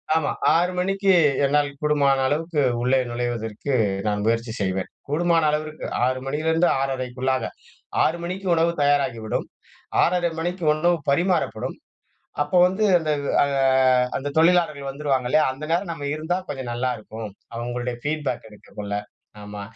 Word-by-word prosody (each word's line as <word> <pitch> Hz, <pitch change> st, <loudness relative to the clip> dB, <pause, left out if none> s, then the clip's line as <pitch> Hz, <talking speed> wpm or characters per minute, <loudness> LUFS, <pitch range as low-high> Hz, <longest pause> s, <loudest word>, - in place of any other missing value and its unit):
ஆமா 160 Hz, -, +1 dB, 0.2 s
6:00 175 Hz, +2 st, +2 dB
மணிக்கு 195 Hz, +1 st, +1 dB, 0.3 s
என்னால் 145 Hz, +1 st, +2 dB
கூடுமான 145 Hz, -2 st, +3 dB
அளவுக்கு 155 Hz, +2 st, 0 dB, 0.2 s
உள்ளே 130 Hz, +2 st, +3 dB
நுழைவதற்கு 120 Hz, +1 st, -3 dB, 0.3 s
நான் 105 Hz, 0 st, 0 dB
முயற்சி 115 Hz, 0 st, 0 dB
செய்வேன், 95 Hz, -1 st, -1 dB, 0.2 s
கூடுமான 165 Hz, +2 st, +2 dB
அளவிற்கு 155 Hz, +1 st, -3 dB, 0.2 s
6:00 130 Hz, 0 st, 0 dB
மணிலருந்து 160 Hz, +5 st, +1 dB
6:30 130 Hz, -1 st, -1 dB, 0.6 s
6:00 165 Hz, +2 st, +1 dB
மணிக்கு 185 Hz, +2 st, -4 dB
உணவு 165 Hz, +1 st, +2 dB
தயாராகிவிடும், 135 Hz, -7 st, +1 dB, 0.6 s
6:30 175 Hz, -1 st, +1 dB
மணிக்கு 175 Hz, +2 st, -3 dB
உணவு 175 Hz, +3 st, +2 dB
பரிமாறப்படும், 175 Hz, +4 st, 0 dB, 0.7 s
அப்போ 150 Hz, +5 st, 0 dB
வந்து 190 Hz, +4 st, 0 dB
அந்த 155 Hz, -2 st, -4 dB, 0.3 s
ஆ -, -, +3 dB, 0.7 s
அந்த 145 Hz, +1 st, -4 dB
தொழிலாளர்கள் 160 Hz, -5 st, +2 dB
வந்துருவாங்க 135 Hz, -2 st, -1 dB
இல்லையா, 155 Hz, 0 st, +4 dB
அந்த 135 Hz, +3 st, -11 dB
நேரம் 175 Hz, +1 st, 0 dB
நம்ம 145 Hz, -3 st, -5 dB
இருந்தா 160 Hz, +4 st, -1 dB
கொஞ்சம் 130 Hz, -4 st, -4 dB
நல்லாருக்கும், 115 Hz, -3 st, -4 dB, 0.3 s
அவங்களுடைய 120 Hz, +1 st, -3 dB
ஃபீட்பேக் 150 Hz, -5 st, -2 dB
எடுக்கக்குள்ள 105 Hz, -1 st, -8 dB, 0.5 s
ஆமா 105 Hz, 0 st, -7 dB
145 Hz, 130 wpm, -23 LUFS, 125-165 Hz, 0.7 s, இல்லையா